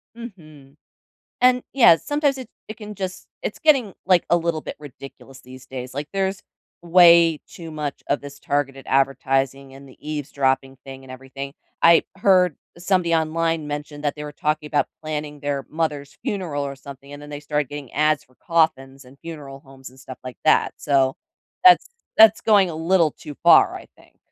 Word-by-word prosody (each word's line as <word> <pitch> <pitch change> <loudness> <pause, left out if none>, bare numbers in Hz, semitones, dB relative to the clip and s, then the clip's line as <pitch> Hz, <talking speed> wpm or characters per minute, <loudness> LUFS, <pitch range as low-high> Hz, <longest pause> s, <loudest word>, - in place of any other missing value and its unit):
Mhm, 155 - -13 0.7
and, 250 0 +4
yeah, 230 -11 +7
sometimes 290 - -1
it 255 -4 -8 0.2
it 215 - -7
can 210 -1 -9
just 185 -2 -6
it's - - -5
getting, 265 -10 +3
like, 180 -2 +3
a 175 - +4
little 165 -2 -1
bit - - -8
ridiculous 135 -2 -13
these 130 0 -13
days, 130 -1 -8
like, 145 +1 -5
there's 195 0 -2 0.4
way 170 -2 +6
too 165 -2 -10
much 150 -2 -5
of 140 - 0
this 140 0 -11
targeted 135 -2 -2
advertising 135 0 0
and 140 0 -14
the 130 - -17
eavesdropping 140 -3 -2
thing 135 0 -10
and 130 - -14
everything, 135 +2 -8 0.3
I 170 0 +6
heard 185 -5 +3 0.2
somebody 175 -1 0
online 165 0 0
mention 145 0 -6
that 145 -1 -1
they 150 - -8
were 150 - -7
talking 150 0 -2
about 150 - +1 0.2
planning 150 -1 -5
their 140 -2 -3
mother's 150 -3 -3
funeral 185 - -3
or 140 0 -6
something, 140 +1 -12
and 145 - -9
then 145 - -11
they 145 0 -7
started 150 -2 -2
getting 145 -4 -9
ads 155 -1 +1
for 130 - -30
coffins 140 -5 0
and 130 +2 -18
funeral 145 -5 -9
homes 135 -2 -14
and 130 - -20
stuff 130 0 -11
like 130 -1 -9
that, 155 - +3
so 135 -2 +1 0.5
that's 365 +5 +7 0.3
that's 220 0 +7
going 205 -4 +4
a - - -6
little 165 -1 +2
too 150 -3 -11
far, - - +6
I - - -11
think. - - -24
150 Hz, 180 wpm, -22 LUFS, 135-170 Hz, 0.7 s, yeah